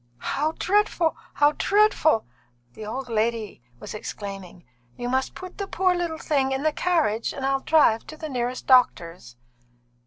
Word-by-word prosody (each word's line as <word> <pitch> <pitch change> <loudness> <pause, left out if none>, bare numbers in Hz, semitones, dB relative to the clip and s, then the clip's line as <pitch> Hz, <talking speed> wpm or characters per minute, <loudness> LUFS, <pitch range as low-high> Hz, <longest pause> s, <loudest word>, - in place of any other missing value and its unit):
"How 300 - -1
dreadful! 380 -4 +1 0.2
how 290 0 +4
dreadful!" 405 - +3 0.5
the 215 - -8
old 255 +4 -5
lady 225 - -2 0.2
was - - -8
exclaiming. 195 -4 -8 0.3
"You 245 0 -4
must 260 +1 -1
put 370 +1 -10
the 400 - -3
poor 370 -1 +1
little 345 -2 -2
thing 275 -4 0
in 265 +1 -2
the 310 -1 +2
carriage, 300 -13 0
and 270 - -4
I'll 270 0 +1
drive 270 -7 +3
to 310 - -9
the 310 - -6
nearest 250 -2 -3
doctor's." 175 - +2
270 Hz, 155 wpm, -24 LUFS, 225-320 Hz, 0.5 s, how